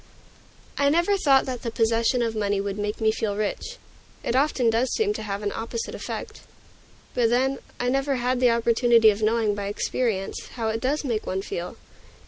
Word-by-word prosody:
I 280 0 +4
never 345 +6 +3
thought 275 -8 +4
that 255 -2 -4
the 235 - -3
possession 230 +2 +1
of 225 -1 -2
money 205 -2 0
would 200 +1 -3
make 210 0 -2
me 220 -1 +3
feel 215 -2 -2
rich: 215 - -3 0.5
it 235 - -1
often 260 -4 +2
does 235 +3 +1
seem 420 -2 +1
to - - -5
have 205 -1 -4
an 205 - -1
opposite 230 0 -4
effect. - - -6 0.7
But 235 -2 +2
then, 260 +3 +1 0.2
I - - -1
have 245 +1 +1
never 275 0 +1
had 250 0 0
the 250 -1 +5
opportunity 235 -1 +4
of 205 +1 -5
knowing, 220 -1 +2
by 200 -1 -4
experience, 205 -1 -2
how 225 -3 -2
it 225 +1 -2
does 285 +4 0
make 230 -5 -2
one 190 +1 -2
feel. 175 -2 -5
230 Hz, 195 wpm, -25 LUFS, 215-255 Hz, 0.7 s, the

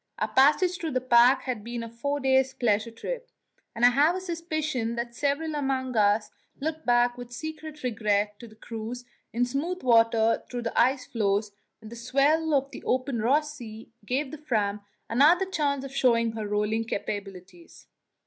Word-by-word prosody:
Our - - -1
passage 305 +7 +3
through 320 -4 -3
the 255 - +2
pack 250 +1 +5
had 245 -5 -4
been 235 +1 -5
a - - -6
four 280 +6 -3
days' 265 0 +2
pleasure 220 -1 +1
trip, - - -6 0.5
and 235 - +3
I 245 - +7
have 295 +7 +3
a - - -2
suspicion 310 -9 -3
that 235 0 -4
several 290 +4 -1
among 265 -3 -2
us 210 0 +2 0.3
looked 315 +1 -4
back 240 0 +3
with 245 0 -9
secret 315 +3 -7
regret 210 -3 0
to 235 - -10
the 215 - -16
cruise 230 +2 -7 0.3
in 240 +2 +1
smooth 315 +9 -3
water 230 -2 +4
through 245 -1 -4
the 230 - -4
ice 255 +2 +2
floes 205 -2 0 0.3
when 220 - -10
the 235 - -9
swell 280 +6 +2
of 275 0 0
the - - -10
open 255 -1 -1
Ross 295 +6 +1
Sea 225 -4 -10
gave 260 +6 -2
the 310 - -8
Fram 210 -8 -1 0.3
another 305 +10 +4
chance 285 -7 -1
of 275 0 -9
showing 230 -3 +3
her 220 -2 -5
rolling 210 +2 0
capabilities. 195 -5 -7
245 Hz, 175 wpm, -27 LUFS, 225-285 Hz, 0.5 s, I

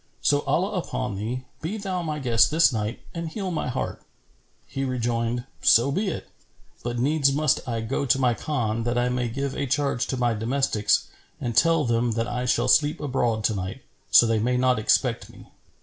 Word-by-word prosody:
So, 145 - +3
Allah 185 +7 +1
upon 125 - -4
thee, 120 +6 -4 0.2
be 180 +8 -3
thou 190 -3 -3
my 155 -3 -3
guest 120 -5 +3
this 155 -3 +4
night 110 +1 -3
and 165 -1 -4
heal 190 +1 -4
my 160 - -2
heart." 125 - -3 0.6
He 135 0 -4
rejoined, 120 -2 -1 0.2
"So 120 +5 +5
be 200 +8 -1
it; 185 - -4 0.5
but 120 0 -3
needs 140 +2 +2
must 150 0 +2
I 115 -1 -2
go 115 +5 -2
to 130 - +4
my 125 -2 +2
Khan, 115 -5 -2
that 120 +1 -1
I 120 0 +2
may 125 -1 -1
give 140 +3 -3
a 140 - -2
charge 140 -1 0
to 130 - -2
my 120 -1 +1
domestics 110 -2 +1 0.3
and 120 -2 -3
tell 165 0 +4
them 115 0 +1
that 115 +1 -1
I 125 +1 -3
shall 120 0 +2
sleep 150 +4 +3
abroad 120 -6 -1
to 110 - +2
night, 95 +6 -5 0.3
so - - +7
they 115 -1 +1
may 125 +3 +1
not 125 -2 +2
expect 110 - +1
me." - - -16
125 Hz, 195 wpm, -25 LUFS, 115-145 Hz, 0.6 s, so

